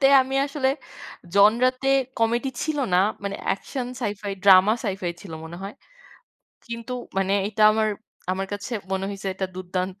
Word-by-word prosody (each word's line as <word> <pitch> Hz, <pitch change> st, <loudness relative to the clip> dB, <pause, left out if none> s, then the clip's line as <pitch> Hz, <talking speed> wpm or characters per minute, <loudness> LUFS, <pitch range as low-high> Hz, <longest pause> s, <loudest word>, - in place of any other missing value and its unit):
তে 270 Hz, -, +6 dB, 0.2 s
আমি 265 Hz, +1 st, -5 dB
আসলে 275 Hz, -2 st, 0 dB, 0.7 s
জনরাতে 250 Hz, +6 st, +4 dB, 0.3 s
কমেডি 235 Hz, +3 st, +1 dB
ছিল 310 Hz, -2 st, -1 dB, 0.2 s
না। 180 Hz, -, +6 dB, 0.2 s
মানে 200 Hz, 0 st, -3 dB, 0.2 s
একশন, 250 Hz, +6 st, -5 dB
সাই-ফাই, 205 Hz, -3 st, -3 dB
ড্রামা 195 Hz, +1 st, +7 dB
সাই-ফাই 190 Hz, -3 st, -2 dB
ছিল 190 Hz, -5 st, -9 dB
মনে 170 Hz, +1 st, -8 dB
হয়। 200 Hz, +2 st, -6 dB, 0.9 s
কিন্তু 235 Hz, +1 st, -6 dB, 0.3 s
মানে 195 Hz, 0 st, +1 dB, 0.2 s
এটা 215 Hz, 0 st, -1 dB
আমার, 215 Hz, 0 st, +2 dB, 0.4 s
আমার 190 Hz, +1 st, -2 dB
কাছে 205 Hz, +4 st, -5 dB, 0.2 s
মনে 190 Hz, 0 st, -1 dB
হয়েছে 195 Hz, -1 st, -4 dB
এটা 190 Hz, 0 st, -2 dB
দুর্দান্ত 185 Hz, +1 st, -4 dB
205 Hz, 150 wpm, -24 LUFS, 190-240 Hz, 0.9 s, ড্রামা